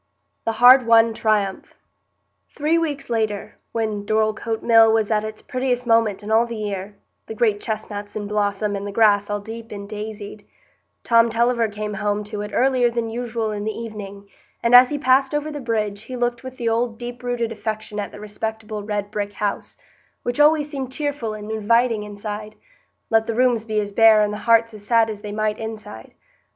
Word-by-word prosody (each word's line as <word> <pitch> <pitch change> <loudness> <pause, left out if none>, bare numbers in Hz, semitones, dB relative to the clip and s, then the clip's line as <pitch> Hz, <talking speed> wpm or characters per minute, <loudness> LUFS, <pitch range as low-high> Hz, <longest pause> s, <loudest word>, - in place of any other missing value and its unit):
The 225 - 0
Hard 245 +2 +7
Won 230 0 +5
Triumph 210 -3 -1 0.7
Three 310 +3 +1
weeks 290 -4 -3
later, 220 -3 -2
when 220 -3 -2
Dorlcote 220 +1 -1
Mill 225 -1 +6
was 220 -1 +1
at 215 -1 +2
its 215 0 -7
prettiest 255 -1 -1
moment 225 -3 +2
in 210 - -5
all 230 +2 +4
the 235 - -6
year,—the 205 +1 -7
great 215 -2 +1
chestnuts 205 -2 -5
in 210 -1 -3
blossom, 205 0 -1
and 200 +1 -4
the - - -5
grass 205 -1 +3
all 205 0 -1
deep 225 +2 -9
and 200 -1 -7
daisied,—Tom 215 +2 -2
Tulliver 235 0 +2
came 210 0 -5
home 205 +1 -1
to 210 0 -5
it 210 - -5
earlier 255 -1 +3
than 230 -1 -3
usual 230 -2 -3
in 205 -1 -4
the 220 0 -3
evening, 200 -3 -8 0.4
and 235 +1 +2
as 250 0 +9
he 295 - -2
passed 270 0 +3
over 295 +1 -2
the 295 -1 -6
bridge, 215 -4 -2
he 255 +4 -8
looked 240 0 -2
with 260 0 -9
the 235 - -3
old 230 0 0
deep 245 0 -7
rooted 245 -2 -2
affection 215 -1 -5
at 205 - -4
the - - -11
respectable 215 0 -5
red 205 -1 -3
brick 205 -1 -3
house, 205 0 -3 0.5
which 245 +3 -2
always 300 0 +5
seemed 270 -4 -5
cheerful 280 -6 -3
and 210 0 -7
inviting 225 +1 +2
outside, 210 +1 -7 0.6
let 225 0 +3
the 230 - -2
rooms 245 -2 +2
be 215 -1 -1
as 205 -1 -3
bare 220 0 +6
and 210 0 -1
the - - -4
hearts 230 0 +4
as 210 -1 -10
sad 225 0 +3
as 210 -1 -8
they 210 -1 -6
might 215 0 -1
inside. 215 - -8
220 Hz, 190 wpm, -22 LUFS, 210-235 Hz, 0.7 s, as